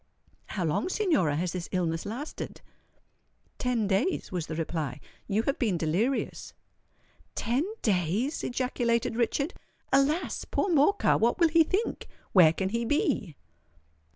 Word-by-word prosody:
"How 185 -4 -2
long, 160 - 0
Signora, 320 - +2
has 175 +3 -1
this 180 -1 -5
illness 165 -2 -1
lasted?" 250 +9 -6 1.0
"Ten 245 -4 0
days," 205 - 0
was 175 -4 -3
the 160 - -4
reply. 160 -4 -3 0.3
"You 215 +2 +1
have 275 - -1
been 210 -8 +1
delirious." 185 - -1 0.8
"Ten 265 - 0
days!" 200 - 0
ejaculated 240 -2 0
Richard. 275 - 0 0.4
"Alas! 285 +6 +2
poor 400 - -1
Morcar—what 290 - +3
will 335 -2 +4
he 330 +1 +5
think? 385 +8 -2 0.2
where 175 -5 +7
can 190 +3 -2
he 230 +3 -1
be?" 240 - 0
230 Hz, 125 wpm, -28 LUFS, 180-285 Hz, 1.0 s, where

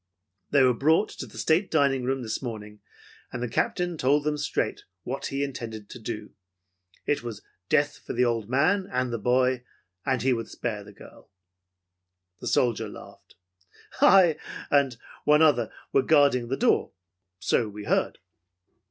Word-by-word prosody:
They 140 -2 +4
were 125 -1 +5
brought 160 - +2
to - - -8
the - - -14
state 170 +5 +2
dining 140 -5 +2
room 135 0 -1
this 110 - -3
morning, 105 -4 -7 0.5
and 125 -1 -4
the - - -1
Captain 175 +8 -1
told 145 +3 +3
them 150 0 0
straight 150 - -2 0.2
what 135 +3 -4
he 135 +1 -2
intended 115 -6 -6
to - - -9
do. 110 -1 -6 0.7
It 145 - 0
was 120 -3 -7 0.3
death 145 -1 +2
for - - -7
the 125 +1 +2
old 115 -3 -1
man 180 +10 +2
and 125 -1 -1
the 115 - -2
boy, 125 +2 +2 0.4
and 130 -3 0
he 130 0 +3
would 115 -2 -3
spare 105 -4 -4
the - - -13
girl." - - -16 1.1
The - - -6
soldier 120 -4 +1
laughed. - - -13 0.7
"I 180 -5 +6 0.3
and 140 -4 +3 0.3
one 150 +1 +5
other 120 -8 +3 0.2
were 135 - +5
guarding 140 -5 +3
the 135 +3 -2
door, - - +2 0.4
so 110 +3 0
we 105 0 -8
heard. - - 0
130 Hz, 160 wpm, -26 LUFS, 120-145 Hz, 1.1 s, I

